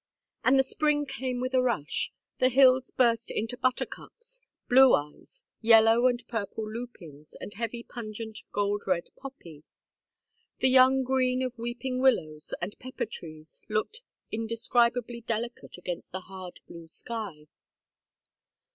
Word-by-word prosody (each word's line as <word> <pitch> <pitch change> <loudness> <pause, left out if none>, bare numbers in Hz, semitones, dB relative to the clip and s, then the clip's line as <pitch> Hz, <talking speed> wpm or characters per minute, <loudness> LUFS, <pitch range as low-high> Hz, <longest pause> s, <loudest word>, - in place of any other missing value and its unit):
And 260 +2 +5
the 265 - +5
spring 295 +1 +1
came 260 -2 -3
with 255 +1 -3
a 255 - +4
rush. 235 - -1 0.3
The 255 - +4
hills 260 0 +5
burst 235 -2 +2
into 225 +3 -2
buttercups, 470 - -4 0.3
"blue 260 +1 +7
eyes," 150 - -8 0.2
yellow 225 +1 +6
and 245 -1 -1
purple 220 -1 -4
lupins, 190 - -9
the - - -7
heavy 235 +2 -4
pungent 220 -2 -6
gold 205 0 -1
red 180 -2 0
poppy. 170 - -11 0.9
The 260 - +3
young 260 +1 +6
green 255 0 +1
of 255 -1 -3
weeping 245 +2 -3
willows 155 -13 +1
and 190 +4 -4
pepper 255 0 -4
trees 155 -7 -10
looked 215 - -2 0.3
indescribably 235 +1 0
delicate 230 -1 -4
against 180 -1 -6
the 185 - -5
hard 185 -1 -10
blue 170 -1 -11
sky. 195 -4 -5
235 Hz, 130 wpm, -28 LUFS, 205-255 Hz, 0.9 s, blue